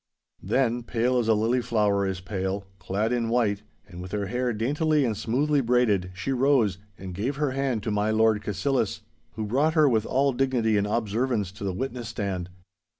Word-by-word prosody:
Then, 120 +3 +1
pale 120 +2 0
as 115 - -1
a 110 - +4
lily 115 +4 +1
flower 105 -4 +1
is 95 -1 -3
pale, 95 0 -3
clad 100 +6 -1
in 115 -2 0
white, 110 -4 +1 0.3
and 90 -2 -9
with 90 +1 -8
her 105 -1 -1
hair 125 +4 -1
daintily 145 +6 +1
and 115 -3 0
smoothly 140 +7 +1
braided, 115 -7 +2
she 95 +8 -3
rose 130 -8 +2 0.2
and 95 -1 -7
gave 115 +10 -2
her 145 -1 0
hand 130 -5 -1
to 110 - -2
my 105 +1 +1
Lord 110 -1 +3
Cassillis, 110 +3 -1 0.3
who 110 0 -4
brought 145 +9 +1
her 155 -2 +5
with 110 -4 +1
all 135 +1 +2
dignity 120 -4 +1
and 100 0 +1
observance 110 -1 -1
to 100 +1 -10
the 100 - -1
witness 120 +3 -4
stance. 95 -4 -3
115 Hz, 190 wpm, -26 LUFS, 100-130 Hz, 0.3 s, her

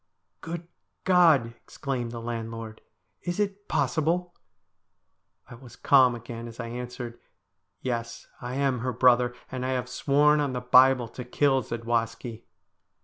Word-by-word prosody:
' - - -51
Good 170 0 -5 0.4
God! 165 -11 +4
exclaimed 130 -5 -4
the 120 - -6
landlord, 115 -1 -6 0.2
' - - -49
is 175 +2 -3
it 205 0 -2
possible! 165 +6 0 0.6
' - - -48
I - - -12
was 120 0 -13
calm 130 -3 +5
again 115 0 -8
as 115 0 -11
I 115 -1 -4
answered, 120 0 -6 0.3
' - - -51
Yes, 115 -2 -4 0.2
I 125 +1 -5
am 135 -2 +1
her 125 +2 -2
brother, 125 0 +4 0.2
and 130 -1 -4
I 130 0 0
have 125 -1 -2
sworn 145 +4 +3
on 140 -3 0
the 125 - -2
Bible 125 0 +5
to 125 - -7
kill 135 +2 +2
Zadwaski.' 115 0 -3
125 Hz, 155 wpm, -27 LUFS, 115-140 Hz, 0.6 s, calm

